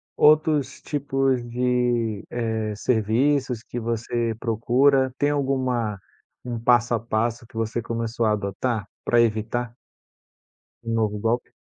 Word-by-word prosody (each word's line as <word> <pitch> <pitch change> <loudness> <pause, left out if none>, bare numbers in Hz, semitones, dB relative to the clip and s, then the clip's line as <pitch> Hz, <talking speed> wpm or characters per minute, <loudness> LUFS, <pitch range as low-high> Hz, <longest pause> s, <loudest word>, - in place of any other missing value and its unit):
outros 150 -3 +3
tipos 135 -3 0
de, 120 -3 0
eh, 110 -3 -2
serviços 125 +3 +1
que 120 - -8
você 115 0 -2
procura, 130 +4 +2
tem 145 - +2
alguma 130 -7 0 0.5
um 120 -1 -3
passo 120 0 +3
a 115 - +2
passo 115 +1 -1
que 115 - -22
você 115 +1 -1
começou 115 0 -2
a 110 - +3
adotar 105 +2 -2 0.2
pra 120 -1 +4
evitar 115 +1 -1 1.1
um 115 - -3
novo 105 -2 0
golpe? 115 +3 -1
120 Hz, 125 wpm, -24 LUFS, 110-130 Hz, 1.1 s, pra